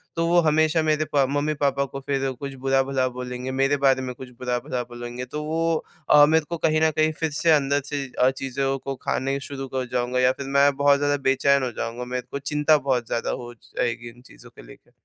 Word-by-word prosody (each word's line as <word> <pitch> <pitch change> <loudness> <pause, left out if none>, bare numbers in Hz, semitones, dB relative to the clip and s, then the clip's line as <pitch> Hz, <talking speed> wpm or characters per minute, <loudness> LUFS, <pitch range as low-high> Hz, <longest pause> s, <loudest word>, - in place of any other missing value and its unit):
तो 165 0 0
वो 175 +1 +4
हमेशा 155 +1 +3
मेरे 155 0 +1
प 140 -1 +5
मम्मी-पापा 145 -1 0
को 135 0 -7
फिर 135 0 -1
कुछ 140 -1 -5
बुरा-भला 135 -1 +1
बोलेंगे, 125 +1 -5
मेरे 135 +2 +1
बारे 135 -1 +3
में 130 -1 -4
कुछ 130 +1 -10
बुरा-भला 125 +1 -2
बोलेंगे। 120 +1 -7
तो 150 +4 -5
वो 165 +1 -1 0.2
अ, 150 0 +8
मेरे 160 +1 +2
को 170 - -3
कहीं 155 -1 +1
न 160 - +5
कहीं 155 +1 +2
फिर 160 -2 -1
से 165 +3 +2
अंदर 145 -1 +3
से 145 -1 -3 0.2
अ, 125 - +5
चीज़ों 135 0 -2
को 135 +1 -5
खाने 135 +1 -2
शुरू 135 -1 -5
कर 130 -1 -1
जाऊँगा 125 0 0
या 125 0 +4
फिर 140 - -7
मैं 140 +1 +6
बहुत 140 0 +4
ज़्यादा 145 0 +1
बेचैन 140 +1 +3
हो 125 - -2
जाऊँगा। 115 +2 -5
मेरे 125 0 -4
को 140 - -3
चिंता 150 +2 +2
बहुत 130 -4 -1
ज़्यादा 115 - -2
हो 120 0 -9
जाएगी 120 0 -4
इन 120 +1 -17
चीज़ों - - -16
को - - -15
लेकर। - - -17
135 Hz, 220 wpm, -24 LUFS, 125-150 Hz, 0.2 s, अ